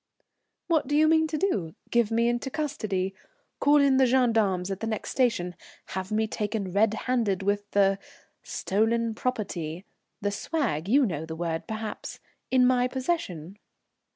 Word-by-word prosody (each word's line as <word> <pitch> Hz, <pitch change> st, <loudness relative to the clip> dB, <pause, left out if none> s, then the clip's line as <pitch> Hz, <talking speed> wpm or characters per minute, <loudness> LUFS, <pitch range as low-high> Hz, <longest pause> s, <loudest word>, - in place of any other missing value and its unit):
"What 320 Hz, -6 st, +1 dB
do 290 Hz, -, 0 dB
you 310 Hz, +1 st, +5 dB
mean 320 Hz, 0 st, +4 dB
to 310 Hz, -, -2 dB
do? 200 Hz, -, -1 dB, 0.2 s
Give 235 Hz, -3 st, +3 dB
me 230 Hz, +1 st, +2 dB
into 240 Hz, +3 st, -1 dB
custody? 215 Hz, -11 st, -2 dB, 0.5 s
Call 290 Hz, +1 st, +5 dB
in 275 Hz, -2 st, +4 dB
the 265 Hz, -1 st, +5 dB
gendarmes 220 Hz, -7 st, +2 dB
at 195 Hz, -, -3 dB
the 225 Hz, -, -3 dB
next 220 Hz, -2 st, -3 dB
station? 230 Hz, -9 st, +1 dB, 0.4 s
Have 190 Hz, +2 st, -4 dB
me 220 Hz, +1 st, +2 dB
taken 210 Hz, -3 st, -3 dB
red 215 Hz, +2 st, +3 dB
handed 225 Hz, -7 st, +1 dB
with 205 Hz, +1 st, -1 dB
the 195 Hz, -1 st, +3 dB, 0.4 s
stolen 225 Hz, +3 st, 0 dB
property 195 Hz, -8 st, -3 dB, 0.3 s
the 205 Hz, 0 st, -1 dB
'swag,' 205 Hz, -, -2 dB
you 275 Hz, +3 st, +5 dB
know 160 Hz, -6 st, -3 dB
the 160 Hz, -, -5 dB
word, 165 Hz, -1 st, -3 dB
perhaps, 220 Hz, -1 st, -5 dB, 0.3 s
in 255 Hz, -1 st, +4 dB
my 250 Hz, 0 st, +3 dB
possession?" 250 Hz, -, -3 dB
220 Hz, 155 wpm, -27 LUFS, 195-255 Hz, 0.5 s, you